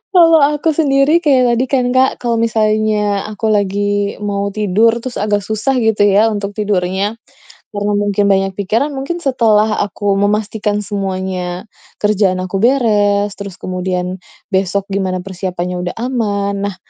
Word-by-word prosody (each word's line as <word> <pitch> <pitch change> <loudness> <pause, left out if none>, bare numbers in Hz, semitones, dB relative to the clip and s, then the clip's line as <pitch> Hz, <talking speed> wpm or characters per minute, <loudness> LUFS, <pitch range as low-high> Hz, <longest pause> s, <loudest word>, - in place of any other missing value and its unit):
Kalau 330 -3 +6
aku 295 +2 +2
sendiri 290 +2 +3
kayak 255 -5 +3
tadi 245 - +1
kan, 255 -3 +2
Kak. 260 +1 +3
Kalau 235 -1 0
misalnya 215 -2 +1
aku 220 +1 -4
lagi 205 0 0
mau 200 -1 -1
tidur 215 +2 +2
terus 255 -2 -6
agak 205 -1 0
susah 220 +5 -1
gitu 220 -2 +2
ya 205 +2 +4
untuk 200 -1 -3
tidurnya, 200 0 -1 0.6
karena 205 0 -1
mungkin 205 0 +1
banyak 195 0 +1
pikiran, 215 +8 0
mungkin 275 +6 -3
setelah 220 -5 +2
aku 200 0 -1
memastikan 210 0 0
semuanya, 190 -2 -4 0.4
kerjaan 205 -3 +2
aku 185 +1 -3
beres, 210 -5 +2
terus 200 -3 -7
kemudian 185 0 -3 0.3
besok 195 +1 0
gimana 185 -2 -1
persiapannya 180 -1 -4
udah - - -8
aman, 205 -5 -1 0.2
nah, - - -12
205 Hz, 140 wpm, -16 LUFS, 195-230 Hz, 0.6 s, Kalau